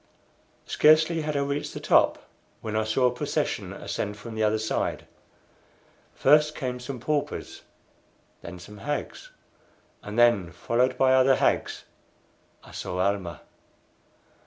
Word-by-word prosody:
Scarcely 155 +2 +4
had 150 -1 -2
I - - +1
reached 140 +1 -3
the - - -4
top - - +2 0.3
when 110 -1 -4
I 110 0 +1
saw 110 +4 +1
a 125 - +4
procession - - -2
ascend 105 0 -4
from 115 +2 -9
the 110 - -3
other 110 0 +2
side. 110 0 -2 1.1
First 150 +2 +4
came 125 -3 -4
some 125 +1 -6
paupers, 145 +4 -3 0.8
then 90 - -9
some 105 +4 -12
hags, 145 +4 -5 0.7
and 105 +2 -7
then, 120 -8 +4
followed 125 +2 0
by 130 0 +4
other 130 0 +5
hags, - - 0 0.8
I - - -15
saw 90 - -5
Almah. 95 -4 -1
125 Hz, 135 wpm, -26 LUFS, 105-140 Hz, 1.1 s, other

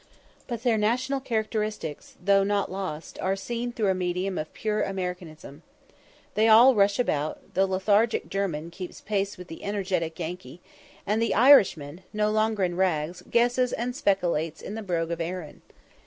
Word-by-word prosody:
But 235 -2 -5
their 230 -4 +2
national 255 +6 0
characteristics, 215 - -3
though 195 +2 +3
not 200 -2 0
lost, 185 -5 -6
are 190 +1 0
seen 240 +4 -4
through 220 -4 0
a - - +2
medium 185 +1 -2
of 155 - -5
pure 215 -1 -2
Americanism. 180 -6 -5 0.7
They 220 +1 +3
all 235 +4 +8
rush 200 -2 +3
about 155 -11 -2
the 195 +1 +2
lethargic 205 +4 +1
German 170 -5 -3
keeps 180 +1 -8
pace 200 -1 -2
with 180 -1 -10
the 165 - -10
energetic 185 -5 -2
Yankee; 170 -3 -6 0.5
and 210 +3 0
the 230 - +1
Irishman, 190 - +5
no 210 0 +1
longer 215 -1 +1
in 175 -1 -1
rags, 175 -2 0
"guesses" 245 +1 +2
and 245 +1 -2
"spekilates" 170 - 0
in - - -7
the 220 - -5
brogue 170 -4 -2
of 170 0 -3
Erin. 170 -2 -5
195 Hz, 160 wpm, -26 LUFS, 175-220 Hz, 0.7 s, all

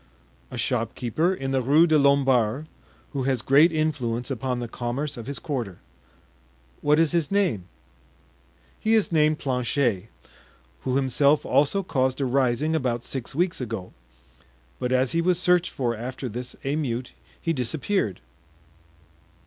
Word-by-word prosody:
"A - - -7
shopkeeper 125 - 0
in 135 -8 -3
the 135 -1 +1
Rue 145 +7 +5
des 160 -2 +4
Lombards, 135 -1 +3 0.5
who 140 - -2
has 130 -3 0
great 150 +5 +5
influence 140 -7 -1
upon 125 0 -2
the 120 -1 -4
commerce 125 +6 -3
of 120 0 -8
his 140 -1 -4
quarter." 115 - -4 1.0
"What 150 +1 +3
is 165 -1 +3
his 170 -4 +1
name?" 180 - +1 1.1
"He 220 +1 +2
is 215 -5 +2
named 155 -1 +3
Planchet, 125 -6 0 0.7
who 130 - -2
himself 140 +2 +3
also 150 +8 +2
caused 130 -6 0
a 140 - +1
rising 130 +3 +1
about 125 -6 -1
six 135 0 -4
weeks 175 -2 0
ago; 110 -6 -5 0.9
but 125 - -2
as 130 0 +2
he 170 - +1
was 180 0 +2
searched 180 -1 +3
for 120 -3 -2
after 125 +3 -5
this 125 +2 -5
emeute 135 -4 -2 0.3
he 165 - -1
disappeared." 135 - -1
135 Hz, 140 wpm, -25 LUFS, 120-155 Hz, 1.1 s, Rue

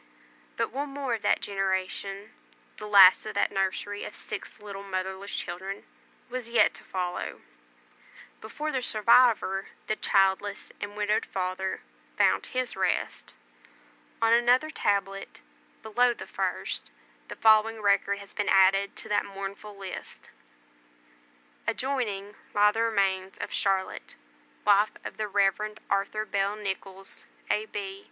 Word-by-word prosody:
But - - 0
one 280 +2 -3
more 275 -3 -3
of 225 - -2
that - - +2
generation 195 +1 -2 0.5
the 210 - -7
last 200 0 +8
of - - -6
that - - +2
nursery 195 +1 -1
of - - -7
six - - -7
little 200 -2 -8
motherless 190 0 -4
children 190 +3 -5 0.4
was 250 -2 -5
yet 235 - +4
to - - -13
follow, 180 -1 -4 1.0
before 305 +1 -4
the 260 - -1
survivor, 225 -4 +4 0.2
the 215 - 0
childless 195 0 +1
and 205 0 -6
widowed 210 +1 +1
father, 190 0 -3 0.4
found - - +3
his 255 -1 -2
rest. - - -1 0.9
On 225 0 +5
another 245 +6 +4
tablet, 195 -4 -1 0.4
below 240 +2 +2
the - - -8
first, - - -3 0.4
the - - -7
following 220 0 +4
record 200 -1 +2
has 200 -1 -12
been 205 -1 -1
added 195 +1 +4
to - - -7
that 205 0 +2
mournful 200 +1 -7
list: 195 -2 -8 1.4
ADJOINING 225 -5 -2 0.2
LIE 210 0 +6
THE 225 +2 -1
REMAINS 195 -4 0
OF - - -5
CHARLOTTE, 195 -1 -1 0.5
WIFE 205 +1 +5
OF - - -7
THE 215 - -2
REV. 205 +1 +1
ARTHUR 200 +2 0
BELL 200 0 0
NICHOLLS, 195 -1 -4 0.3
A.B. 200 -2 -3
205 Hz, 130 wpm, -28 LUFS, 195-220 Hz, 1.4 s, last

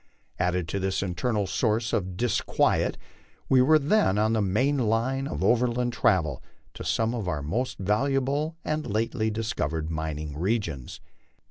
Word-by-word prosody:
Added 90 -1 0
to 100 - -2
this 95 0 -1
internal 100 +3 -1
source 110 +3 0
of 90 -2 -1
disquiet, 120 0 +1 0.5
we 130 -1 +6
were 155 +5 +6
then 145 - +2
on 110 +1 +2
the 110 - +2
main 130 +9 +1
line 125 +4 0
of - - -3
overland 120 0 +2
travel 80 - +1 0.3
to - - -8
some 115 +1 0
of 110 -6 -3
our 75 -5 -2
most 120 - -2
valuable 135 - 0
and 155 0 -2
lately 110 +1 0
discovered 80 -8 -2
mining 80 -2 -4
regions. 85 - -2
110 Hz, 145 wpm, -26 LUFS, 90-125 Hz, 0.5 s, we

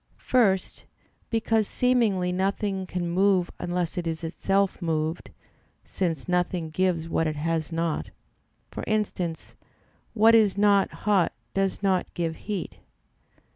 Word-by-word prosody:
First, 200 -7 +1 0.4
because 225 -2 +1
seemingly 225 -8 +2
nothing 195 +1 -1
can 180 -1 -3
move 185 0 +2
unless 175 0 -2
it 170 - -4
is 160 0 -3
itself 195 +4 0
moved, 160 0 -2 0.6
since 170 -5 -2
nothing 180 -2 -1
gives 170 -1 0
what 165 -1 0
it 155 - -2
has 160 +1 -2
not; 165 -1 -2 0.6
for - - -6
instance, 185 -6 -2 0.6
what 225 +1 +6
is 215 -4 +4
not 200 -1 +4 0.2
hot 200 -5 +3 0.2
does 195 +1 -1
not 190 -2 +1
give 165 -2 -2
heat. 205 -5 -4
185 Hz, 125 wpm, -26 LUFS, 165-200 Hz, 0.6 s, what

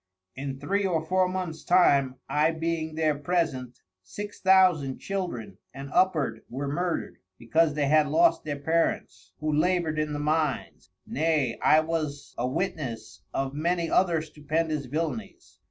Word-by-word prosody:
In 135 0 -5
Three 200 +8 0
or 165 -4 0
Four 185 +2 +2
Months 180 -3 -4
time 140 -7 +4
I 150 +2 +2
being 160 -1 -2
there 155 -1 +2
present, 145 -5 -2 0.2
Six 205 - -8
Thousand 180 -8 +4
Children 120 - -5 0.2
and 140 +1 -8
upward 170 -7 +2
were 135 +3 -4
murder'd, 170 +4 -2 0.2
because 155 +6 +2
they 145 -1 +1
had 155 +1 +4
lost 340 +1 +3
their 145 -2 -3
Parents 160 +4 -1
who 155 0 0
labour'd 165 -1 +1
in 155 -1 -1
the - - -2
Mines; 150 -2 -1 0.2
nay 150 -5 0
I 155 - +5
was 155 -3 -4
a 125 - -1
Witness 130 - -4
of 135 0 -2
many 170 +3 -1
other 170 -4 +3
stupendous 155 0 -2
Villanies. 145 -6 -5
155 Hz, 145 wpm, -27 LUFS, 140-170 Hz, 0.2 s, I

